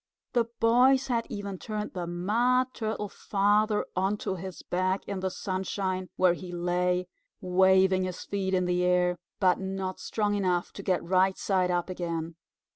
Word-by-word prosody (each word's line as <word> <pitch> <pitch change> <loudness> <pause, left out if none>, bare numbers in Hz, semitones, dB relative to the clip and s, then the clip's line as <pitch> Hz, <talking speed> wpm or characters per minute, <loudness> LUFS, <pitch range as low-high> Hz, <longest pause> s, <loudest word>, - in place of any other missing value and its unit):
The 240 -2 +3
boys 255 +4 +4
had 235 -2 0
even 200 -2 -5
turned 210 -1 -4
the 175 -2 -4
Mud 240 +9 +1
Turtle 215 -2 -3
Father 210 +2 +1
onto 195 +1 0
his 185 0 -7
back 185 +2 -1
in 200 - -3
the 190 0 -1
sunshine, 185 0 -3
where 185 -2 +4
he 180 0 -8
lay, 180 +1 0 0.3
waving 190 0 +4
his 185 -1 -5
feet 190 -1 -1
in 180 -1 +1
the 180 0 +1
air, 180 -1 +2 0.2
but 185 -2 +3
not 190 -1 -4
strong 210 -2 -1
enough 180 -3 0
to - - -7
get 185 -2 0
right 185 +2 +2
side 185 -2 +1
up 175 -1 0
again. 170 -3 -4
190 Hz, 160 wpm, -28 LUFS, 180-205 Hz, 0.3 s, boys